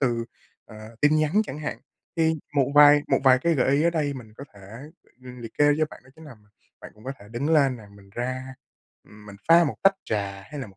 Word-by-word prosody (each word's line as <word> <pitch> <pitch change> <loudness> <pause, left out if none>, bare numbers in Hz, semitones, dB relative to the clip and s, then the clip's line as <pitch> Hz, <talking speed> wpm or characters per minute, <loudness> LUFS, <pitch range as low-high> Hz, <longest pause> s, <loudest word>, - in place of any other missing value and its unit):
từ, 120 -4 0 0.4
ờ, 110 +1 -13
tin 150 +1 +4
nhắn 155 0 0
chẳng 145 - -7
hạn. 150 - -5 0.4
Thì 160 -1 +2 0.2
một 140 -1 +1
vài 145 0 +7
một - - +2
vài 130 -1 +6
cái 165 +5 0
gợi 130 - +1
ý 150 - +1
ở 170 - +3
đây 150 -4 -1
mình 115 -5 -11
có 140 - -9
thể, 100 - -16 0.6
ờ, 125 - -9
liệt 115 -1 -9
kê 145 0 +5
cho 155 - +3
bạn, - - -14
đó 130 - -19
chính 160 - -15
là 145 -5 -12
mình 105 -1 -27 0.3
bạn - - -11
cũng 105 - -19
có 135 - -4
thể 100 - -16
đứng 120 +7 -4
lên 140 -5 +3
nè, 110 - -14
mình 100 -1 -19
ra 130 +2 -5 0.5
mình 105 -1 -14
pha 170 +1 +7
một 145 - -3
tách 195 0 +5
trà 100 -2 -4
hay 145 +7 -9
là 125 - -6
một 95 -2 -18
130 Hz, 250 wpm, -24 LUFS, 110-150 Hz, 0.6 s, vài